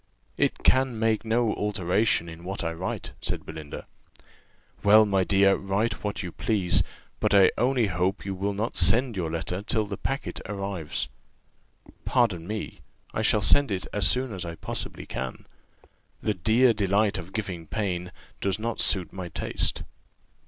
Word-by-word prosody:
"It - - 0
can 130 -2 +3
make 110 -1 +1
no 115 0 +1
alteration 105 -2 +1
in 80 0 -10
what 95 +1 -4
I 80 0 -1
write," 90 +3 -4
said - - -3
Belinda. 75 -2 -7 1.0
"Well, 110 +1 +7
my 95 -2 +2
dear, 100 +1 +4
write 100 +4 -1
what 105 -1 -2
you 90 - -5
please; 100 -4 +2 0.4
but - - +2
I 95 -1 +7
only 125 0 +2
hope 95 +1 -1
you 100 - -2
will 100 +2 -2
not 110 +4 -2
send 120 0 +3
your 85 -4 -2
letter 85 +3 -3
till 110 +1 0
the 100 -1 -5
packet 135 0 -3
arrives." 100 -8 -3 1.0
"Pardon 105 -10 +1
me, 105 0 -5 0.3
I - - -1
shall - - +3
send 145 -2 +5
it 95 -2 -2
as 105 -2 +3
soon 125 -2 0
as 95 - -4
I 85 -1 -5
possibly - - -5
can: 65 0 -5 0.7
the 110 - 0
'dear 110 +7 +4
delight 100 0 +2
of 90 +1 -9
giving 95 -7 -4
pain' 90 -1 -2 0.3
does 95 -1 0
not 115 +1 -2
suit 90 -5 +2
my 95 -2 -6
taste." - - -1
100 Hz, 160 wpm, -26 LUFS, 90-110 Hz, 1.0 s, Well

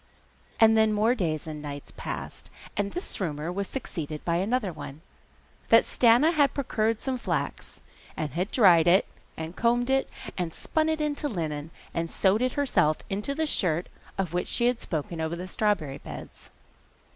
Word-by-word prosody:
And 225 0 +7
then 220 -1 +4
more 215 +3 +3
days 165 - -1
and 155 -1 -6
nights 145 -1 -7
passed, - - -6 0.3
and 200 0 -1
this 360 - -3
rumour 155 -1 -2
was 200 +2 -3
succeeded 160 - -5
by 170 -1 +1
another 205 0 0
one 150 0 -9 0.7
that - - +7
Stana 250 +7 +4
had 285 -4 +3
procured 225 -5 0
some 260 +2 -3
flax, - - -3 0.4
and 155 -3 -2
had 180 +7 -2
dried 180 -9 +6
it, 185 +3 +5 0.3
and 160 +2 -5
combed 240 +2 +2
it, 270 0 +2 0.3
and 170 -3 -2
spun 315 0 0
it 315 -1 0
into 295 0 -1
linen, 155 - -3 0.2
and 165 0 -2
sewed 195 +6 +2
it 255 0 +1
herself 255 - +2
into 210 +8 -2
the 315 +1 0
shirt 175 - +1 0.3
of 185 -4 -2
which 180 - -1
she 240 - +1
had 245 -1 +2
spoken 160 +1 -3
over 160 +1 -1
the 180 +2 -6
strawberry 185 -10 0
beds. - - -10
195 Hz, 170 wpm, -27 LUFS, 160-245 Hz, 0.7 s, And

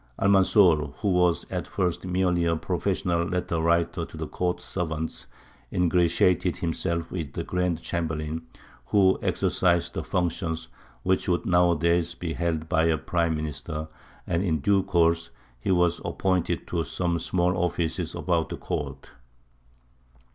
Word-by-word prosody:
Almanzor, 95 - +4
who 100 - +1
was 90 -2 +2
at - - -3
first 90 0 -1
merely 90 -1 +1
a 85 0 +2
professional 90 0 0
letter 85 -1 -1
writer 85 +1 +1
to 80 - -9
the 80 - -3
court 90 +3 -2
servants, 80 -3 -4 0.4
ingratiated 90 0 +2
himself 85 0 -2
with 80 -7 -4
the - - -3
Grand 90 -2 -1
Chamberlain, 80 -1 -2 0.5
who 95 -2 +4
exercised 85 -2 +1
the - - -3
functions 85 -2 -2 0.3
which 95 0 +1
would 90 -1 +1
nowadays 85 -1 +2
be 85 -2 -4
held 80 -2 -2
by 80 +1 +2
a 80 -1 +3
Prime 85 +2 0
Minister, 75 +1 -5 0.4
and 85 - 0
in 80 -5 +1
due 100 +5 +3
course 85 -2 +2 0.3
he - - -4
was 90 -2 +2
appointed 95 -3 0
to 85 -2 0
some 85 0 -1
small 90 +2 +1
offices 85 -2 -1
about - - 0
the - - -5
court. 70 -2 -5
85 Hz, 140 wpm, -26 LUFS, 80-90 Hz, 0.5 s, Almanzor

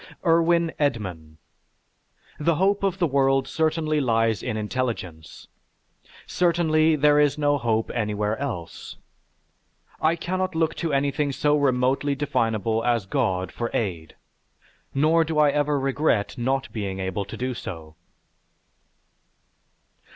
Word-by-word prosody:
IRWIN 170 0 +3
EDMAN 90 - -2 1.0
The 165 +2 +2
hope 195 +4 +2
of 195 -2 0
the 180 - +2
world 135 -2 +2
certainly 155 -1 0
lies 115 -4 +1
in 120 -4 -3
intelligence. 105 -8 -4 0.8
Certainly, 160 -3 +2
there 150 0 +4
is 145 -1 +2
no 145 -1 +1
hope 115 -2 0
anywhere 105 -2 -1
else. 115 -13 -6 1.0
I 160 +2 +3
cannot 185 +1 -3
look 160 -1 +1
to 165 -2 -2
anything 140 +1 0
so 150 +2 +1
remotely 135 0 +1
definable 115 -5 0
as 120 -4 +1
God 95 -1 -1
for 120 0 -4
aid, 85 -7 -3 0.8
nor 155 +4 +3
do 160 -1 -3
I 150 -1 +5
ever 145 0 +1
regret 135 -5 0
not 130 +1 -2
being 100 -3 -4
able 95 +1 -2
to - - -8
do 130 +1 -2
so. 80 -8 -8
135 Hz, 120 wpm, -24 LUFS, 110-155 Hz, 1.0 s, I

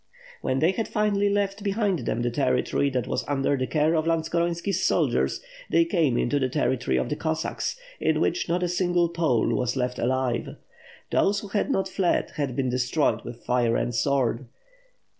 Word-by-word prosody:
When 130 - 0
they 160 +6 +3
had 225 +3 -2
finally 205 -2 +1
left 200 0 -1
behind 200 - 0
them 120 - -1
the 120 - 0
territory 130 +2 +1
that 130 -2 -1
was - - -2
under 140 0 +1
the 130 -1 -2
care 155 +1 +2
of 160 0 +1
Lantskoronski's 170 +3 0
soldiers, 190 - +1 0.3
they 335 - +4
came 160 - +1
into 145 +4 +1
the 130 -1 0
territory 130 - 0
of 65 - 0
the - - -2
Cossacks, 160 - -2 0.2
in - - +1
which 365 - 0
not 175 +1 +1
a - - +1
single 175 -1 +1
Pole 160 -9 +1
was 125 0 0
left 125 -1 -2
alive. 125 -1 -1 0.6
Those 200 +1 +2
who 205 - -9
had 205 +6 0
not 195 -8 +1
fled, 185 -1 0
had 140 -4 -2
been 135 -2 0
destroyed 125 +4 +1
with 120 0 -9
fire 120 -2 +2
and 120 - -1
sword. 125 0 0
155 Hz, 180 wpm, -25 LUFS, 125-185 Hz, 0.6 s, they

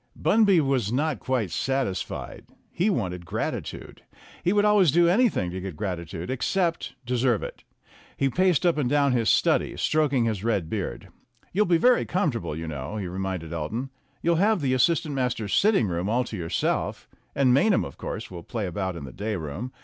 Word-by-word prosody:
Bunby 205 -5 +4
was 130 -7 0
not 150 +3 0
quite 125 -8 -1
satisfied. 130 +3 -3 0.3
He 185 +5 +1
wanted 90 - -2
grati 80 - -3
tude. - - -10 0.4
He 180 - +2
would 205 +1 +3
always 205 -7 +5
do 170 +3 +4
anything 185 - +2
to 95 +1 -5
get 95 -3 -6
gratitude, 85 0 -4
except 165 +7 -1
deserve 125 -2 +1
it. - - -8 0.5
He 135 - +2
paced 180 +3 +2
up 170 -3 +3
and 130 -4 0
down 140 -1 +3
his 120 -3 +2
study, - - +2
stroking 145 -6 +2
his 105 -4 -2
red 100 -8 0
beard. 95 - -4 0.4
"You'll 210 +3 +2
be 175 -1 +4
very 250 +7 +4
comfortable, 145 - -1
you 80 +1 -5
know," 75 +6 -5
he 100 - -3
reminded 90 -2 -4
Elton. 110 - -4 0.3
"You'll 170 0 +3
have 205 +1 +3
the 130 -2 +1
as 130 - +3
sistant 160 -1 +2
masters' 125 -6 -1
sitting 200 - +3
room 90 +2 -2
all 120 +3 +2
to 120 - -7
yourself, 85 -4 -2 0.3
and 130 -3 +4
Maynham, 200 - +3
of 70 - -10
course, - - -5
will 85 -2 -7
play 110 +4 -4
about 95 0 -3
in 85 - -7
the 65 - -10
day 105 +3 -3
room. 90 - -5
125 Hz, 190 wpm, -25 LUFS, -, 0.5 s, always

